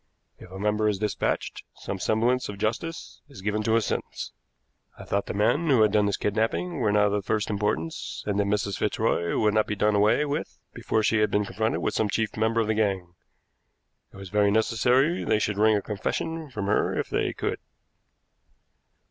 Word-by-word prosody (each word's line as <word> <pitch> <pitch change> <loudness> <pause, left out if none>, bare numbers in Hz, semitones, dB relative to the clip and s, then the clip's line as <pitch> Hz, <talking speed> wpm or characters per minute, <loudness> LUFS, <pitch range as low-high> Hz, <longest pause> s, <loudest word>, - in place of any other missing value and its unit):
If - - -12
a 95 - -9
member 105 +1 +1
is 105 - -1
dispatched, 105 0 -2
some 95 - -6
semblance 120 +6 +1
of 100 - -6
justice 120 +11 -4
is 130 -9 -12
given 105 +1 0
to 110 +1 +1
his 115 - +2
sentence. - - -4 0.7
I - - -9
thought 100 0 -1
the - - -3
men 145 +11 +2
who 125 -6 +5
had 105 - +3
done 105 -1 +3
the 100 - 0
kidnapping 115 - -1
were 110 -4 +2
not 105 0 +4
of 105 - +1
the 105 0 0
first 105 +2 -1
importance, 100 -6 -2
and 105 -1 -1
that 100 - +1
Mrs. 100 -1 -1
Fitzroy 85 0 0
would 105 -1 +2
not 110 0 +2
be 105 - -2
done 105 +1 +2
away 105 +8 +3
with 145 +1 -4 0.2
before 110 - -1
she 110 +1 +2
had 105 - +3
been 105 0 +1
confronted 110 +2 -1
with - - 0
some 110 - 0
chief 110 +1 -1
member 110 +1 +1
of - - 0
the 110 - +2
gang. 95 -5 -1 1.0
It - - -14
was 95 -1 -9
very 105 +1 +3
necessary 125 - +2
they - - +2
should 105 -1 -1
wring 110 0 +5
a 100 - -3
confession 155 +9 -3
from 105 -6 -4
her 105 +2 +1
if - - -1
they - - 0
could." - - -3
105 Hz, 205 wpm, -26 LUFS, 100-110 Hz, 1.0 s, who